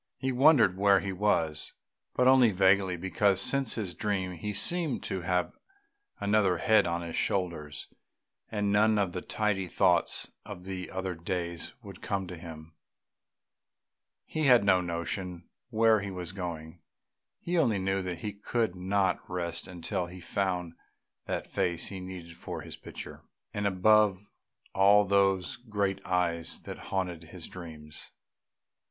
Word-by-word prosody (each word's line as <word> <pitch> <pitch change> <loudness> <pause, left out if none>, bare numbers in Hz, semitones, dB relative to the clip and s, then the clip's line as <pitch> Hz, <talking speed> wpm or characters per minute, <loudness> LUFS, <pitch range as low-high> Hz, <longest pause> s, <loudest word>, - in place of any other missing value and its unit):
He 130 0 -1
wondered 130 - +5
where 100 -1 +5
he 95 - -3
was, 85 -6 0 0.4
but 125 - +3
only 130 -2 +7
vaguely, 95 -1 +3
because 95 +2 +2
since 135 -4 +2
his 100 -6 -3
dream 95 -2 -1
he 90 +4 -4
seemed 155 - +1
to 95 - -3
have 90 0 0 0.7
another 100 -3 +2
head 110 +1 +4
on 85 0 -2
his 85 -1 -5
shoulders, 80 -6 -2 0.6
and 105 -2 -1
none 105 +1 +4
of 100 -3 +1
the 90 - -4
tidy 100 -3 -1
thoughts - - +2
of 90 +1 -9 0.2
other 95 -1 -3
days 85 0 -4
would - - -11
come 100 -1 -2
to 90 0 -7
him. 80 -1 -10 1.5
He 155 -1 -2
had 125 -5 +6
no 95 -2 +4
notion 85 +1 -4 0.2
where 110 -1 +4
he 100 0 -5
was 90 -2 -6
going; 85 -3 -6 0.6
he 175 0 0
only 115 -10 +3
knew 95 +1 0
that 90 -2 -4
he 105 - -3
could 110 -1 -1
not 95 0 +1
rest 85 -1 -3
until 90 0 -3
he 90 +1 -10
found 90 -2 -2 0.5
that - - -2
face 85 -1 -1
he 95 - -6
needed 90 -2 -8
for - - -6
his - - -8
picture, - - -9 0.3
and 105 0 0
above 100 +1 +4 0.6
all 100 +2 +6
those 95 -4 +2
great 100 -5 -2
eyes 85 -3 0
that - - -8
haunted 90 -3 -2
his 85 0 -7
dreams. 80 -4 -10
95 Hz, 145 wpm, -29 LUFS, 90-105 Hz, 1.5 s, only